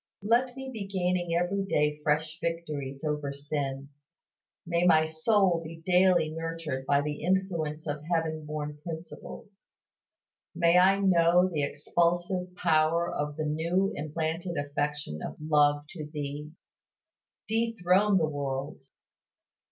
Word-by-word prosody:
Let 245 +4 +2
me 265 0 -6
be 205 -4 -5
gaining 180 -3 0
every 180 +3 0
day 150 -5 +1
fresh 155 +2 0
victories 150 -5 -4
over 150 -2 -2
sin; 140 -1 -4 0.8
may 170 0 +1
my 160 -3 +5
soul 170 +2 +2
be 165 0 -10
daily 180 -3 +4
nurtured 165 -4 -4
by 140 0 +4
the 150 0 -4
influence 170 -4 -1
of 145 -1 -3
heaven 160 -2 0
born 150 -1 -5
principles. 175 +4 -9 0.9
May 170 +1 +5
I 195 +2 +5
know 175 -1 +4
the 160 -5 -2
expulsive 175 +5 0
power 165 0 +2
of 145 0 -3
the 155 - -1
new 170 +6 0
implanted 160 +3 -3
affection 145 - -3
of - - -6
love 145 -1 +3
to 155 -5 -7
Thee. 150 0 -5 1.0
Dethrone 210 -3 +2
the 165 - +3
world. 140 -1 -4
160 Hz, 125 wpm, -28 LUFS, 150-180 Hz, 1.0 s, my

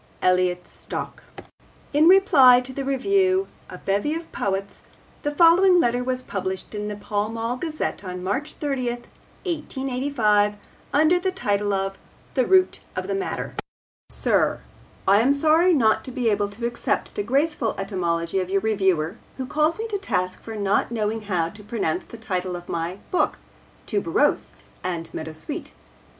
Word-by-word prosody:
(Elliot 180 -1 +2
Stock.) - - -7 0.7
In 300 +3 +5
reply 320 -10 +7
to 255 +1 -7
the 275 - -3
review 375 +8 +2 0.2
A - - -8
Bevy 205 +11 0
of 330 0 -7
Poets 195 0 -3 0.4
the 295 - -1
following 350 +4 +6
letter 245 -4 +2
was 255 0 -2
published 190 -2 -4
in 210 0 -3
the 210 - -4
Pall 205 +1 -2
Mall 230 +2 -2
Gazette 310 -5 -3
on 180 -1 -6
March 210 +11 -2
30, 275 -4 -2 0.6
1885, 260 - 0 0.4
under 315 +5 +4
the 375 +1 0
title 205 - 0
of 195 0 -2 0.3
THE 255 - +2
ROOT 375 -1 +4 0.2
OF - - -2
THE - - -1
MATTER 390 -1 -3 0.6
SIR, - - +1 0.5
I 200 +2 +6
am 255 +5 +4
sorry 315 +5 +4
not 230 -9 +3
to 260 - -6
be 245 -3 +1
able 205 0 0
to 220 +4 -6
accept 235 0 -2
the - - -2
graceful 270 +1 0
etymology 180 -3 -1
of 185 -1 -3
your 195 0 +1
reviewer 190 -4 +1 0.2
who 260 - -3
calls 305 +4 +1
me 445 - -3
to 405 -2 -2
task 185 - -2
for 225 - -7
not 200 -1 +1
knowing 220 -1 -1
how 170 -4 +1
to 210 +4 -13
pronounce 235 - -2
the 230 - -11
title 185 -4 -3
of 175 0 -8
my 170 +2 -3
book 365 - +1 0.5
Tuberose 170 - 0 0.3
and 170 -2 -4
Meadowsweet. 155 0 -6
225 Hz, 160 wpm, -24 LUFS, 195-295 Hz, 0.7 s, reply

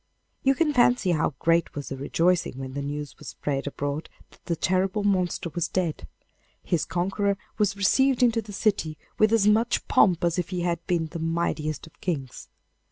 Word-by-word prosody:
You 270 0 +3
can 310 -1 +2
fancy 245 -6 +4
how 155 -3 0
great 165 +3 +1
was 145 -1 -5
the 135 - -4
rejoicing 165 +2 +1
when 130 -1 -6
the 140 - -3
news 145 0 -5
was - - -11
spread 140 -1 -3
abroad 145 +2 -3 0.2
that - - -22
the 170 - -1
terrible 190 +4 0
monster 185 -4 0
was 175 - 0
dead. 175 -4 -2 0.6
His 170 -3 0
conqueror 195 +3 0 0.2
was 200 -2 +1
received 265 +6 +3
into 230 -2 +3
the 210 -1 -11
city 195 -7 0 0.2
with 215 0 +5
as 225 -3 +4
much 225 +3 +2
pomp 180 -5 +4
as 170 +1 +1
if 175 - -3
he 180 -2 -2
had 170 -1 -1
been 170 -2 +1
the 170 - -5
mightiest 160 -2 -2
of 160 - -19
kings. 150 - -4
175 Hz, 185 wpm, -26 LUFS, 155-205 Hz, 0.6 s, with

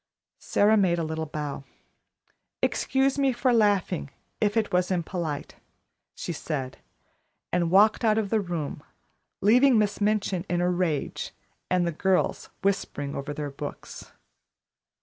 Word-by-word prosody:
Sara 215 +2 +3
made 180 -4 +3
a 165 - -1
little 160 0 -3
bow. 145 -2 -5 1.0
"Excuse 270 +1 +1
me 275 -1 +3
for 250 0 +1
laughing, 205 -8 +2 0.3
if 210 +1 +1
it 215 -4 0
was 180 0 +2
impolite," 170 -4 -3 0.6
she 175 - -4
said, 140 -5 -4 0.7
and 175 -1 +2
walked 210 +6 +5
out 215 -1 +3
of 210 -3 -1
the 220 -1 +3
room, 170 -6 -4 0.6
leaving 245 +5 +5
Miss 210 -1 +1
Minchin 200 -4 +1
in 175 - +1
a 180 +1 +2
rage 175 -5 -2 0.3
and 180 -1 +2
the 170 - 0
girls 190 +3 0
whispering 165 -7 -1
over 140 +2 -4
their 145 -1 -4
books. 145 +1 -8
180 Hz, 135 wpm, -26 LUFS, 160-215 Hz, 1.0 s, walked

